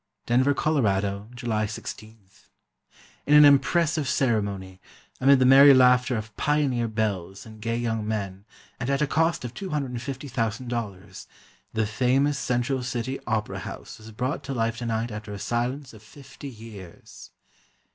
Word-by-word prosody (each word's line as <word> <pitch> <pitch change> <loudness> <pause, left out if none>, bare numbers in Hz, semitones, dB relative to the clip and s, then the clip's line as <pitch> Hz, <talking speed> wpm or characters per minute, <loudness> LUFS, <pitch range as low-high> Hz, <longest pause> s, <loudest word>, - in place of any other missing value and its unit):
Denver, 130 +4 +3
Col., 155 0 +1 0.5
July 110 -4 -1
16.—In 110 +6 -9
an 150 0 +9
impressive 150 +1 +3
ceremony, 100 -7 -1 0.4
amid 140 +1 +6
the 130 - +3
merry 135 +2 +8
laughter 125 -1 +4
of 110 -1 -7
"pioneer" 140 -5 +1
belles 100 -4 -3
and 110 -1 -13
gay 115 +1 -1
young 115 -2 -2
men, 100 -3 -4 0.4
and 125 - -3
at 140 +2 +1
a - - +3
cost 165 0 0
of 120 - -6
$250,000, 125 - -4 0.5
the 110 -1 +1
famous 130 +6 +1
Central 125 +2 -1
City 125 +1 -3
Opera 110 -2 -2
House - - -9
was 110 +1 -12
brought 125 +6 -3
to 135 -1 -4
life 115 -1 -1
tonight 115 -1 -2
after 105 0 -7
a - - -5
silence 125 +6 -3
of 110 - -14
fifty 140 +4 -11
years. 110 -7 -12
120 Hz, 135 wpm, -25 LUFS, 110-135 Hz, 0.5 s, an